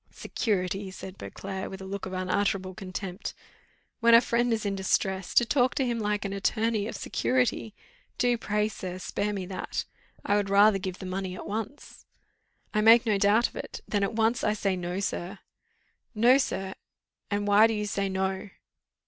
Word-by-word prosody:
"Security!" 195 -2 -2
said 190 0 -9
Beauclerc, 190 -1 -6
with 190 - -8
a 190 - -8
look 195 0 -5
of 190 - -7
unutterable 185 0 0
contempt. 185 +1 -6 0.6
"When 235 -1 +6
a - - +10
friend 240 0 +1
is 220 -2 0
in 200 -1 0
distress, 190 0 -1
to 240 - +6
talk 255 +1 +2
to 270 - +1
him 235 -2 -1
like 210 -1 -1
an 195 - -3
attorney, 215 +1 0
of - - -5
security! 250 -4 0 0.4
Do, 245 -1 +3
pray, 210 -2 0
sir, 185 -4 -6
spare 200 +2 -2
me 195 -3 -3
that. 185 0 -4 0.4
I 205 - +3
would 200 -1 0
rather 200 0 +5
give 185 -1 -4
the 190 - -8
money 185 0 -3
at - - -8
once." 225 +7 -6 0.7
"I 215 - +2
make 230 +2 +7
no 210 -3 +2
doubt 210 +4 +4
of - - -18
it; - - -6
then 205 - 0
at 200 +2 0
once 225 +2 +1
I 210 - +2
say 200 -2 0
No, 180 +1 -3
sir." 195 0 -3 0.8
"No, 245 +5 +6
sir! 190 -7 -2 0.6
and 205 0 -1
why 205 +2 +7
do 225 - -1
you 210 0 -2
say 200 -1 -1
no?" 190 +1 -2
200 Hz, 185 wpm, -28 LUFS, 190-220 Hz, 0.8 s, a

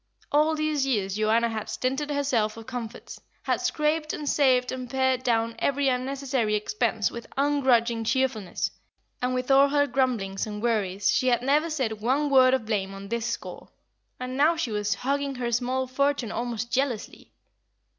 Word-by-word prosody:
All 305 +2 +3
these 310 -2 0
years 205 -8 0
Joanna 220 +2 +2
had 220 -2 -4
stinted 260 +7 -2
herself 255 -7 0
of 225 - -9
comforts, 245 -2 -7 0.2
had - - 0
scraped 305 0 0
and 295 - -5
saved 255 -3 +3
and 255 -1 -5
pared 260 -1 +1
down 230 -2 +1
every 280 0 +1
unnecessary 255 -3 -1
expense 215 +1 0
with 235 -1 -8
ungrudging 255 -5 +2
cheerfulness, 225 -5 -1 0.5
and 250 +1 0
with 255 +1 -1
all 275 +1 +6
her 285 0 +3
grumblings 235 -9 -1
and 210 -1 -5
worries 205 -4 0
she 255 - +1
had 240 -1 +2
never 295 +5 +2
said 240 -9 -2
one 280 +5 +1
word 260 -1 +6
of 260 - -4
blame 195 -3 -2
on 195 0 -9
this 235 0 -2
score. 235 - -6 0.5
And 255 0 -5
now 305 +5 +4
she 315 -8 -2
was 210 0 0
hugging 280 +1 -2
her 245 -1 -2
small 255 +2 0
fortune 270 -2 0
almost 235 0 -3
jealously. 255 -5 -2
255 Hz, 165 wpm, -26 LUFS, 225-275 Hz, 0.5 s, all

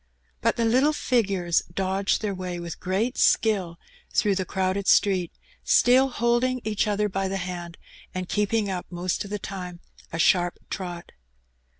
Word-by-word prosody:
But - - +2
the 230 - 0
little 260 +7 +3
figures 195 - +1
dodged 195 +3 0
their 205 -2 -1
way 180 -2 -5
with 170 -1 -7
great 205 +7 -1
skill 190 -7 +2 0.4
through 210 -2 +3
the 190 -1 -1
crowded 190 +1 -1
street, 185 -4 +3 0.3
still 260 +2 +5
holding 245 +1 +1
each 215 0 0
other 210 0 +1
by 195 -1 -2
the 195 +1 -2
hand 175 -2 -6 0.3
and 185 -1 -4
keeping 210 +1 0
up 185 -2 -4
most 175 0 -2
of 200 - -9
the 210 - -2
time 180 -3 -7 0.3
a 165 - -4
sharp 175 +1 +3
trot. 175 -3 -5
195 Hz, 160 wpm, -25 LUFS, 180-215 Hz, 0.4 s, still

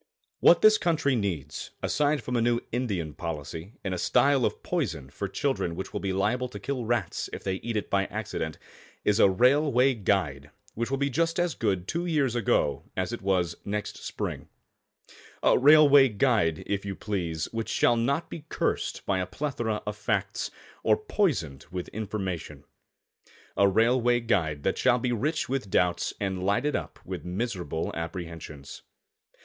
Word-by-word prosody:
] - - -49
What 170 - +6
this 215 0 +7
country 155 -6 +1
needs, 85 - -3
aside 145 -3 +1
from 125 - -3
a 120 - +2
new 120 0 +2
Indian 100 -11 -2
policy 80 +4 -6
and 95 - -2
a 90 - -3
style 130 +3 +3
of - - -3
poison 85 - -2
for 100 +7 -4
children 95 -5 -1
which 95 - -6
will 105 - -2
be 100 -1 -2
liable 110 +7 0
to 105 - -8
kill 130 +2 -3
rats 120 -7 -1
if - - -7
they 95 -1 -1
eat 115 +2 -3
it 105 - -2
by 100 0 +2
accident, 100 -7 -4 0.5
is 105 +1 +3
a 100 - +7
Railway 130 +4 +4
Guide 85 - -1 0.2
which 115 +1 -2
will 135 - 0
be 140 0 0
just 165 +5 +1
as 175 -2 +1
good 95 -7 -1
two 170 +2 -2
years 145 -7 +1
ago 100 - +1 0.2
as 95 +5 -1
it 120 - -5
was 90 -3 +1
next 105 +1 -4
spring - - -4 1.0
a - - +5
Railway 145 -1 +7
Guide, 105 - +1
if 100 -1 -2
you 100 -1 -4
please, 85 -7 -2
which 115 -1 -3
shall 120 - +3
not 140 +8 0
be 150 - -8
cursed - - -1
by 95 -1 +1
a 90 - -2
plethora 120 -7 -3
of 105 - -3
facts, 105 - -1 0.3
or - - +3
poisoned 155 - -1
with 90 0 -5
information 95 -9 -4 0.9
a 100 - +5
Railway 120 +4 +3
Guide 85 -11 0
that - - 0
shall 120 - +4
be 125 +1 -1
rich 150 +7 0
with 130 -6 -2
doubts 90 -1 +1
and 95 -2 -2
lighted 105 +10 +1
up - - -4
with - - -5
miserable 90 -3 -3
apprehensions. 80 -4 -7
105 Hz, 170 wpm, -27 LUFS, 90-130 Hz, 1.0 s, this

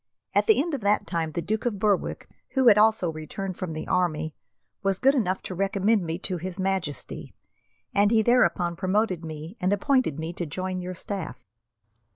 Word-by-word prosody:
At - - +2
the 440 - +5
end 325 +3 0
of 275 - -2
that 205 +1 +2
time 165 -2 -2
the 170 - -2
Duke 220 +1 -1
of 215 -4 -1
Berwick, 205 -1 0 0.3
who 260 -3 +6
had 210 - +6
also 215 -5 +4
returned 180 +5 -5
from 175 -3 -4
the 155 - -5
army, 160 -4 0 0.5
was 195 -1 +1
good 270 +5 +4
enough 190 -8 0
to - - -5
recommend 195 +2 +1
me 165 0 -3
to 185 -2 0
His 185 +2 -6
Majesty, 190 -6 -3 0.6
and 205 +1 +4
he 220 0 +4
thereupon 205 -7 +3
promoted 185 -1 0
me 160 +5 -7
and 185 0 +1
appointed 205 - +2
me 160 +2 -4
to 175 -1 -4
join 185 +4 -3
your 180 0 -5
staff." 190 -2 -5
185 Hz, 190 wpm, -26 LUFS, 170-210 Hz, 0.6 s, who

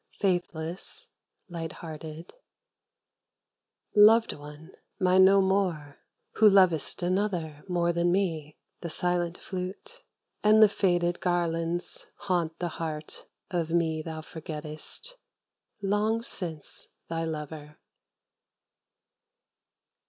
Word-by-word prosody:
Faithless, 175 -3 -1 0.4
light 165 -3 -5
hearted 160 0 -9 1.6
Loved 220 +2 +6
one, 150 +3 -11 0.3
mine 185 0 +5
no 195 +1 +6
more, 185 -7 0 0.4
who 215 -1 +7
lovest 185 -4 +4
another 175 -5 -1
More 175 -1 +1
than 170 +1 +2
me; 165 -6 -1 0.2
the 170 - -5
silent 175 +1 +1
flute 185 0 -7 0.4
and 215 +1 +6
the - - +9
faded 175 -3 +1
Garlands 170 -1 -1
haunt 175 -5 -1
the 175 - -2
heart 155 -1 -5 0.2
of 170 -3 -1
me 165 -2 +1
thou 160 0 -6
forgettest, 155 - -6 0.7
Long 210 +3 +1
since 165 -9 -2 0.2
thy 165 0 -2
lover. 150 -1 -6
175 Hz, 95 wpm, -28 LUFS, 160-190 Hz, 1.6 s, the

